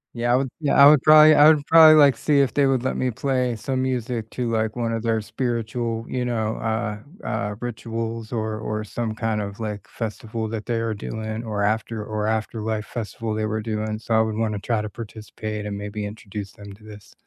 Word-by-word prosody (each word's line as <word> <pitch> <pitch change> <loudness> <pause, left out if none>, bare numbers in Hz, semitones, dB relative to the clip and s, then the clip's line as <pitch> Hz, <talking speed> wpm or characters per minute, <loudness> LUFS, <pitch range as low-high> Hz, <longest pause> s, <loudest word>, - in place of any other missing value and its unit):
Yeah, 120 +1 +1
I - - +5
would 130 0 0
yeah, 150 -3 0
I 140 +1 +9
would 150 -3 +5
probably 155 0 +8
I 150 +1 +7
would 150 -2 +4
probably 160 -1 +8
like 140 -5 +6
to - - -16
see 145 -2 +3
if 135 -5 0
they 140 -1 +3
would 130 -2 +1
let 130 - -1
me 130 -1 0
play 125 0 -1
some 130 +4 -2
music 120 -3 -2
to, 120 -2 -2
like, 110 -1 -1
one 120 -2 -1
of 115 0 -3
their 110 -1 +1
spiritual, 115 -1 -3
you 125 -1 -2
know, 110 -3 -1
uh, 110 -2 -2 0.3
uh, 105 0 -2
rituals 115 -1 -5
or 110 -1 -2
or 110 0 -3
some, 110 +1 -4
kind 110 -2 -1
of, 100 +1 -6
like, 105 -2 -5
festival 110 0 -5
that 110 -1 -5
they 115 -2 -1
are 115 -1 -1
doing 110 +2 -5
or 105 -2 -2
after 110 +1 -1
or 105 0 -3
afterlife 110 0 -2
festival 115 -1 -5
they 110 0 -1
were 110 0 -2
doing, 110 -1 -3
so 115 +1 -3
I 110 - +5
would 110 -1 -1
wanna 110 -2 -1
try 115 +1 -1
to 105 - -5
participate 105 -1 -7
and 100 -1 -4
maybe 105 +1 -5
introduce 105 -1 -7
them 100 -1 -12
to 105 +2 -18
this. 105 -2 -13
110 Hz, 220 wpm, -23 LUFS, 105-120 Hz, 0.3 s, I